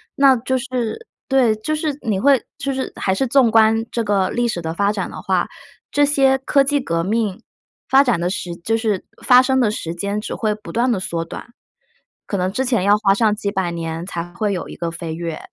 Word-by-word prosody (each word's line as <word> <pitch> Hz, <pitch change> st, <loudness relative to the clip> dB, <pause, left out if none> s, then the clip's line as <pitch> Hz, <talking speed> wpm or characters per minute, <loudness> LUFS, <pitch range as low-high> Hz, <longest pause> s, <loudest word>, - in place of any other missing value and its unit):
那 275 Hz, -1 st, +6 dB
就 260 Hz, +3 st, -1 dB
是 255 Hz, -, -4 dB, 0.2 s
对， 255 Hz, -5 st, +3 dB
就 310 Hz, +9 st, -2 dB
是 305 Hz, -2 st, -2 dB
你 215 Hz, -6 st, -1 dB
会 275 Hz, +2 st, +4 dB
就 275 Hz, -, -2 dB
是 265 Hz, 0 st, -3 dB
还 190 Hz, -, 0 dB
是 260 Hz, +8 st, 0 dB
纵 245 Hz, -2 st, +4 dB
观 225 Hz, 0 st, +4 dB
这 235 Hz, -, -1 dB
个 200 Hz, -3 st, +1 dB
历 240 Hz, 0 st, 0 dB
史 180 Hz, -7 st, -3 dB
的 160 Hz, 0 st, -3 dB
发 200 Hz, +3 st, +1 dB
展 -, -, -3 dB
的 -, -, -8 dB
话， -, -, 0 dB, 0.4 s
这 290 Hz, 0 st, +4 dB
些 270 Hz, -2 st, +3 dB
科 275 Hz, +1 st, +3 dB
技 285 Hz, +1 st, +1 dB
革 165 Hz, -6 st, -1 dB
命 210 Hz, 0 st, -1 dB, 0.5 s
发 270 Hz, +1 st, +6 dB
展 245 Hz, -10 st, +1 dB
的 175 Hz, +1 st, 0 dB
时 180 Hz, -2 st, -4 dB
就 220 Hz, +6 st, -1 dB
是 220 Hz, -4 st, -1 dB, 0.2 s
发 250 Hz, 0 st, +8 dB
生 265 Hz, 0 st, +1 dB
的 220 Hz, -4 st, +2 dB
时 170 Hz, -5 st, -5 dB
间 200 Hz, +3 st, -2 dB
只 210 Hz, -, -5 dB
会 215 Hz, -2 st, 0 dB
不 215 Hz, -, -10 dB
断 245 Hz, +2 st, +2 dB
地 205 Hz, -, 0 dB
缩 170 Hz, -2 st, -3 dB
短， 200 Hz, +7 st, -10 dB, 0.7 s
可 -, -, -3 dB
能 185 Hz, +1 st, 0 dB
之 260 Hz, +6 st, -1 dB
前 240 Hz, -7 st, +1 dB
要 205 Hz, +2 st, +4 dB
花 200 Hz, -2 st, +3 dB
上 215 Hz, +1 st, +2 dB
几 205 Hz, -1 st, -3 dB
百 190 Hz, -4 st, -1 dB
年 165 Hz, 0 st, -4 dB
才 175 Hz, -2 st, -6 dB
会 210 Hz, +2 st, -1 dB
有 180 Hz, -, -4 dB
一 -, -, -8 dB
个 170 Hz, -1 st, -3 dB
飞 165 Hz, -1 st, -6 dB
跃， 165 Hz, -1 st, -4 dB
215 Hz, 245 characters per minute, -20 LUFS, 185-260 Hz, 0.7 s, 发